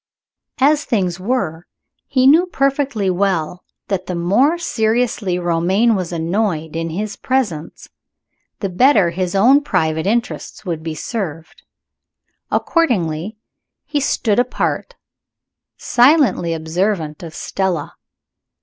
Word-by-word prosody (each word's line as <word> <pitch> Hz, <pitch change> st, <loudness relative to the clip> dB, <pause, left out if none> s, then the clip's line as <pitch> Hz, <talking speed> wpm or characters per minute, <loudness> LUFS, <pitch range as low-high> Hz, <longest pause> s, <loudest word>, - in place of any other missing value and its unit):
As 295 Hz, +2 st, +3 dB
things 185 Hz, -7 st, -1 dB
were, 185 Hz, -6 st, -2 dB, 0.4 s
he 255 Hz, -1 st, +2 dB
knew 325 Hz, +7 st, +6 dB
perfectly 275 Hz, -, 0 dB
well 180 Hz, -2 st, -1 dB, 0.2 s
that 190 Hz, -2 st, -2 dB
the 180 Hz, -, -3 dB
more 210 Hz, -, +2 dB
seriously 225 Hz, -, 0 dB
Romayne 180 Hz, +6 st, +2 dB
was 185 Hz, -4 st, -2 dB
annoyed, 165 Hz, -2 st, -1 dB
in 165 Hz, 0 st, -2 dB
his 205 Hz, +5 st, -4 dB
presence, 210 Hz, -13 st, -2 dB, 0.7 s
the 195 Hz, -, -1 dB
better 200 Hz, -2 st, +4 dB
his 180 Hz, +1 st, -2 dB
own 255 Hz, +9 st, +5 dB
private 160 Hz, -, 0 dB
interests 230 Hz, 0 st, -2 dB
would 165 Hz, -3 st, -3 dB
be 160 Hz, -1 st, -5 dB
served. 165 Hz, -4 st, -5 dB, 0.9 s
Accordingly, 205 Hz, -, 0 dB, 0.5 s
he 295 Hz, -, -1 dB
stood 230 Hz, -5 st, +1 dB
apart, 250 Hz, -, -1 dB, 0.8 s
silently 250 Hz, -, +3 dB
observant 160 Hz, 0 st, -2 dB
of 165 Hz, -2 st, -9 dB
Stella. 185 Hz, -6 st, -2 dB
195 Hz, 110 wpm, -18 LUFS, 170-245 Hz, 0.9 s, knew